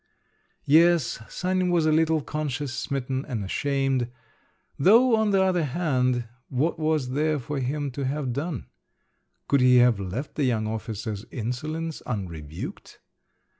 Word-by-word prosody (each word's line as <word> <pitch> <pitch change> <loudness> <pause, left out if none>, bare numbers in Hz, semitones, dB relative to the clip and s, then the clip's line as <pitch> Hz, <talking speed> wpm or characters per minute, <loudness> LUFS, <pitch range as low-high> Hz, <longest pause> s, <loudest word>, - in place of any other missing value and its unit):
Yes, 165 -3 +4
Sanin 185 0 0
was 170 -3 +2
a 155 - +3
little 160 0 +3
conscience 145 -3 -3
smitten 135 -1 -2
and 120 -8 -4
ashamed… 135 +2 0 0.7
though, 230 - +6
on 220 -1 +2
the 195 -1 +3
other 180 -3 +2
hand, 130 -5 0 0.2
what 150 +6 0
was 155 -5 0
there 150 +3 +1
for 140 +2 -4
him 140 +2 -2
to 135 +2 -4
have 135 -2 -2
done? 140 - -3 0.8
Could 140 -2 +3
he 125 0 +6
have 120 -4 +5
left 105 +10 -4
the 150 - -1
young 115 -4 +1
officer's 110 -1 -4
insolence 155 +7 -4
unrebuked? 85 - -6
140 Hz, 135 wpm, -26 LUFS, 125-160 Hz, 0.8 s, though